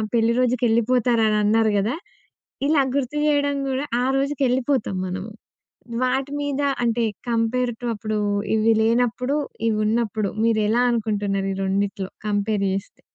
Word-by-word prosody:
పెళ్ళి 230 0 +3
రోజుకెళ్ళిపోతారని 235 -2 +2
అన్నారు 220 0 +3
గదా! 220 +8 0 0.7
ఇలా 295 -2 +4
గుర్తు 280 +1 -1
జేయడం 285 -1 +2
గూడా 265 +2 -1 0.2
ఆ - - +1
రోజుకెళ్ళిపోతాము 265 -6 0
మనము. 185 +4 -5 0.7
వాటి 265 +2 0
మీద 285 0 -2 0.2
అంటే 235 0 +1 0.3
కంపేర్‌‌ 235 +1 0
టు 240 - -3
అప్పుడు 215 0 -3 0.4
ఇవి 220 +1 +3
లేనప్పుడు 245 +4 +1 0.3
ఇవున్నప్పుడు 215 -1 0
మీరు 220 -2 +2
ఎలా 240 +2 +3
అనుకుంటున్నారు 205 -4 -1
ఈ - - -5
రెండిట్లో 195 0 -1 0.2
కంపేర్ 205 0 0
జేస్తే? 195 0 -5
230 Hz, 125 wpm, -23 LUFS, 215-255 Hz, 0.7 s, ఇలా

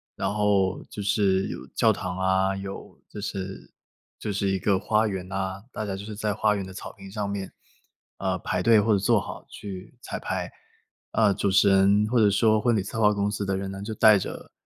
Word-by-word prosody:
然 - - -2
后 100 -3 +2
就 105 - -6
是 95 -2 +2
有 65 - -7
教 - - +4
堂 90 0 -4
啊， 95 +1 +2
有 95 0 -8
就 - - -8
是 95 -2 -6 0.4
就 105 - -4
是 100 0 -1
一 95 - +1
个 95 0 +1
花 110 +1 +2
园 95 -1 -5
啊， 95 +1 -4
大 - - -3
家 95 -2 -3
就 100 - -8
是 105 0 -7
在 105 0 -1
花 105 0 +2
园 100 -2 -3
的 95 - -10
草 - - -8
坪 95 0 -12
上 105 -1 -3
面， 100 -2 -4 0.7
呃， - - -1
排 - - -2
队 115 -2 +6
或 105 +1 +3
者 - - +4
坐 110 +3 +3
好 - - -8
去 95 -3 -8
彩 - - -5
排。 - - -3 0.6
呃， 105 -3 +3
主 100 - 0
持 100 +1 +5
人 100 +2 +4
或 125 - +1
者 105 -2 +5
说 110 +1 +3
婚 120 -2 +2
礼 105 - +1
策 110 +3 -5
划 105 -1 +5
公 100 0 0
司 100 0 -3
的 95 -1 -1
人 95 0 -4
呢， 95 0 -7
就 110 +2 -4
带 105 -1 +6
着 - - -7
100 Hz, 240 characters per minute, -26 LUFS, 95-105 Hz, 0.7 s, 队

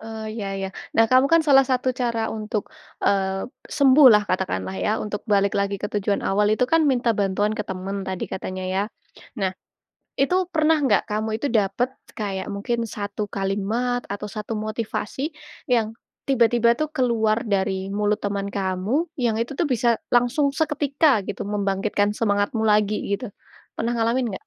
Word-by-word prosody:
Eee, 220 -1 -6
iya 200 - -3
iya, 195 0 -3 0.3
nah 225 - +6
kamu 255 +4 +4
kan 330 0 +4
salah 275 -3 +7
satu 255 -1 0
cara 235 -3 -1
untuk, 215 -1 -4 0.3
eee, 195 -1 +1 0.2
sembuhlah 260 -7 +6
katakanlah 140 - -2
ya 95 - +1
untuk 210 -1 -4
balik 200 -1 +3
lagi 200 0 0
ke 205 +1 -6
tujuan 205 0 0
awal 205 +2 +2
itu 215 +4 +2
kan 315 +3 +3
minta 245 -3 +2
bantuan 205 +1 0
ke 215 - -3
teman 190 +1 -4
tadi 190 -1 -4
katanya 185 0 -5
ya, 190 +1 0 0.5
nah 190 -3 0 0.7
itu 275 +6 +2 0.2
pernah 310 -2 +2
nggak 270 - +2
kamu 215 0 -2
itu 260 - -2
dapat 220 +5 +1 0.2
kayak 195 -2 -3
mungkin 230 +4 -2
satu 205 0 -4
kalimat 205 +6 -1
atau 205 +1 -4
satu 215 +1 -5
motivasi 215 +6 -3 0.4
yang 225 -3 +2 0.3
tiba-tiba 235 -2 +4
tuh 310 +3 -2
keluar 230 -5 +1
dari 190 -2 0
mulut 210 0 +1
teman 200 0 -3
kamu 195 - -1 0.2
yang 225 -2 +1
itu 235 +5 -2
tuh 335 +4 0
bisa 240 -1 +3 0.2
langsung 245 +4 +3
seketika 290 -4 +2
gitu 200 0 -5
membangkitkan 205 0 0
semangatmu 205 +1 +1
lagi 210 0 +3 0.2
gitu, 205 +2 -5 0.5
pernah 235 +1 0
ngalamin 235 +2 +1
nggak? - - -10
215 Hz, 160 wpm, -23 LUFS, 200-245 Hz, 0.7 s, salah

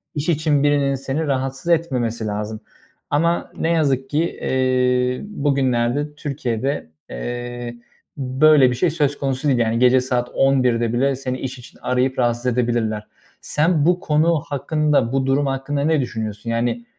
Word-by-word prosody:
iş 145 +3 -2
için 155 -3 +2
birinin 145 -1 +2
seni 135 +4 -3
rahatsız 135 +4 -1
etmemesi 125 -9 0
lazım 105 +1 -4 0.5
ama 170 +4 0
ne 165 - 0
yazık 135 -5 +1
ki 150 - 0 0.2
eee, 125 -1 +1
bugünlerde 140 - 0
Türkiye'de, 135 - -3 0.2
eee, 120 - -5 0.4
böyle 135 +1 +4
bir - - -2
şey 175 +7 +2
söz 145 -3 0
konusu 135 +1 -1
değil. 130 -4 +3
Yani 115 0 +1
gece 125 +1 +5
saat 125 -1 -1
11'de 125 -4 +2
bile 135 +2 +1
seni 130 -1 -4
iş 130 -1 -5
için 120 - -15
arayıp 125 +1 0
rahatsız 120 0 0
edebilirler. 120 -3 0 0.3
Sen 155 0 +1
bu 180 +1 +3
konu 155 0 +2
hakkında, 145 -3 +1
bu 135 -1 +1
durum 135 +2 +2
hakkında 135 +1 -2
ne 155 -1 +2
düşünüyorsun? 110 -2 -5
Yani, 115 0 -1
130 Hz, 150 wpm, -21 LUFS, 120-145 Hz, 0.5 s, gece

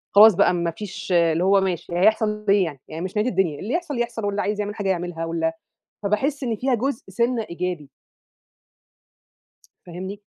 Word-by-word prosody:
خلاص 210 -1 +9
بقى 200 - +4
ما 170 -1 -1
فيش 195 +1 -7
اللي 170 0 +3
هو 195 +1 +4
ماشي 175 -2 -2
هيحصل 210 +2 +2
إيه 200 -1 +5
يعني؟ 145 -5 -6
يعني 160 +1 -6
مش 190 +3 -5
نهاية 220 +4 +2
الدنيا 175 -8 0
اللي 230 +8 -4
يحصل 335 -8 -2
يحصل، 235 -2 -2
واللي 205 0 -1
عايز 210 0 -2
يعمل 205 0 -3
حاجة 205 -3 -2
يعملها، 175 -2 -2
وال 165 0 -1 0.5
فباحِس 265 +8 0
إن 230 -3 -1
فيها 260 +3 0
جزء 250 +2 -2
سِنّة 235 +3 0
إيجابي. 170 -4 -4 2.0
فاهمني؟ 185 +4 -7
200 Hz, 175 wpm, -23 LUFS, 175-220 Hz, 2.0 s, خلاص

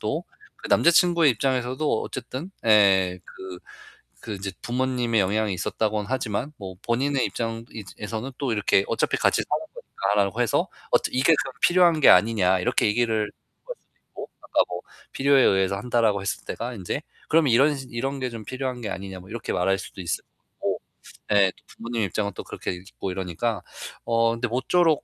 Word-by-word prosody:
또 - - -2 0.4
그 - - -6
남자친구의 170 -2 +5
입장에서도 130 +2 0
어쨌든 155 +9 -6 0.2
예 95 -4 +5
그 95 -1 -9 0.6
그 110 - -6
인제 100 0 -4
부모님의 125 -2 0
영향이 100 +1 +1
있었다고는 105 +3 -1
하지만 130 +1 -2
뭐 95 -2 -7
본인의 130 +3 +1
입장이 115 -1 -4 0.3
에서는 110 +5 -5
또 140 -3 -1
이렇게 100 -2 +2
"어차피 - - +1
같이 - - +2
사는 - - -1
거니까."라고 100 +2 -1
해서 120 - +2 0.3
"어 - - +7
이게 135 +6 +4
그럼 135 - -8
필요한 175 -3 +5
게 - - +8
아니냐." 95 -2 +4
이렇게 - - +1
얘기를 110 0 +1
할 105 - -4 0.3
수도 - - -8 0.4
있고 - - -8
아까 - - 0
뭐 - - -5 0.3
필요에 140 0 +4
의해서 95 0 +3
한다라고 110 -1 +1
했을 95 - -3
때가 120 +2 -4
인제, 100 +6 -3 0.3
그럼 160 -1 +4
"이런 135 +5 +4
이런 135 +4 -3
게 130 - -1
좀 115 -2 -8
필요한 130 0 -4
게 105 - -3
아니냐." 95 -1 -6
뭐 90 - -14
이렇게 115 0 -4
말할 95 +2 +1
수도 95 - -9
있을 85 - -3
것 - - -50 0.2
같고. - - -3 0.5
예 100 -2 +5
또 - - -26
부모님 115 -1 -4
입장은 100 +1 -1
또 - - -6
그렇게 - - -5
있고 95 +1 -6
이러니까. 95 +3 -2 0.4
어 115 0 +3
근데 115 +1 -2
모쪼록 155 +6 +2
115 Hz, 375 characters per minute, -25 LUFS, 100-130 Hz, 0.6 s, 게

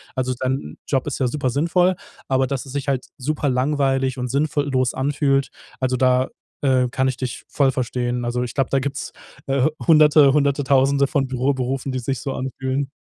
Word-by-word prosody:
Also 130 -1 -1
dein 130 - -3
Job 135 -3 0
ist 145 - -3
ja 130 - +2
super 130 0 -1
sinnvoll, 175 +7 +2 0.3
aber 130 0 +2
dass 135 0 -3
es 135 - -10
sich 140 0 -4
halt 135 -2 0
super 145 +1 -1
langweilig 135 0 +1
und 125 -1 -3
sinnvoll 145 +1 0
los 130 -1 +1
anfühlt, 140 0 +1 0.3
also 130 0 +1
da, 130 0 +2 0.3
äh, 130 -3 +3
kann 130 +2 0
ich 130 - -4
dich 130 -2 -5
voll 140 -2 +2
verstehen. 125 -1 -2
Also 125 +1 -1
ich 120 - -5
glaube, 135 -2 0
da 135 - +2
gibt's, 140 +1 -4 0.4
äh, 135 -1 +2 0.2
100te, 150 -3 +6
100te 140 -1 +2
1000 140 +1 +3
von 135 -1 0
Büroberufen, 130 +1 -1
die 130 - -1
sich 130 +1 -3
so 135 - -3
anfühlen. 135 +1 -3
135 Hz, 190 wpm, -21 LUFS, 130-140 Hz, 0.4 s, 100te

